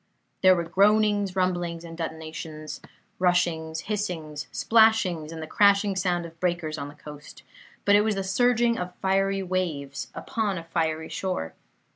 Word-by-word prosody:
There 185 0 +7
were 170 - -1
groanings, 205 +2 +3
rumblings, 175 -2 -1
and 165 -1 -9
detonations; 160 -1 -6 0.4
rushings, 165 -3 +1
hissings, 170 -8 -4
splashings, 220 -8 +3
and 160 -1 -6
the - - -4
crashing 200 +3 +3
sound 180 -2 0
of 165 0 -12
breakers 170 -3 -1
on 140 - -4
the 145 - -11
coast; 150 0 -12 0.4
but 200 - +5
it 205 - +6
was 215 -1 0
the 195 - -2
surging 235 +4 +2
of 180 0 -5
fiery 195 0 +1
waves 165 -7 -3
upon 215 -6 -2
a 165 - -6
fiery 160 -1 -2
shore. 185 - -3
180 Hz, 150 wpm, -26 LUFS, 160-195 Hz, 0.4 s, There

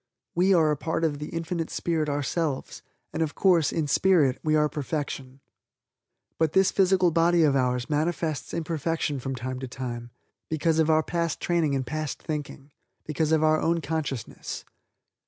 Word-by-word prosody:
We 185 +3 +3
are 160 -3 +4
a 150 - 0
part 165 +3 -2
of 150 -3 0
the 150 - -5
Infinite 165 0 -3
Spirit 160 -3 -1
ourselves 145 0 -2 0.3
and, - - -2
of 155 -2 -1
course, 175 -6 +3
in 160 - 0
spirit, 150 -5 +3
we 155 0 +2
are 150 0 +4
perfection. 140 -3 -4 1.0
But 160 -1 +2
this 190 0 +4
physical 185 -2 +3
body 170 +1 +4
of 145 -3 +3
ours 125 -2 +1
manifests 155 0 -1
imperfection 165 -2 -2
from 135 +1 -4
time 130 +1 -4
to 130 - -5
time, 120 -2 -6 0.4
because 160 +1 +1
of 160 0 +3
our 155 0 +4
past 170 -2 -2
training 165 -5 +1
and 130 -1 -1
past 155 +3 -3
thinking, 150 -2 -6 0.3
because 155 +1 -1
of 160 -1 +3
our 155 0 +3
own 170 0 +2
consciousness. 150 -7 -4
155 Hz, 165 wpm, -26 LUFS, 140-165 Hz, 1.0 s, are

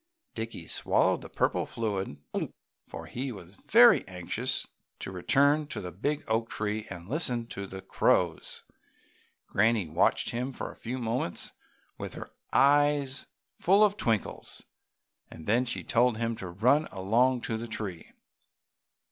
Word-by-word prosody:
Dickie 115 0 -6
swallowed - - +2
the - - -10
purple - - 0
fluid, 100 -8 -3 0.7
for - - -9
he 130 +2 -4
was 95 -4 -11
very 235 - +6
anxious 95 +8 -2 0.3
to - - -6
return 145 - +3
to - - -4
the 90 - -6
big 145 - -2
oak 115 +1 0
tree 105 +1 -3
and 90 -2 -8
listen 125 -3 0
to 100 0 -5
the 95 0 -8
crows. - - +1 0.8
Granny 110 -2 +2
watched 80 +4 +2
him 125 +3 -3
for - - -5
a - - -15
few 120 +3 -5
moments 115 -6 -3 0.5
with - - -6
her - - -8 0.2
eyes 145 -1 +3 0.3
full 195 +4 +4
of 205 -1 +4
twinkles, 115 - -2 0.7
then 110 +10 0
she 120 - -3
told 120 -1 +2
him 115 0 -1
to 90 - -6
run 125 - +3
along 120 +7 +2
to 115 - -2
the 115 +1 -4
tree. 100 -7 -5
115 Hz, 140 wpm, -29 LUFS, 100-135 Hz, 0.8 s, very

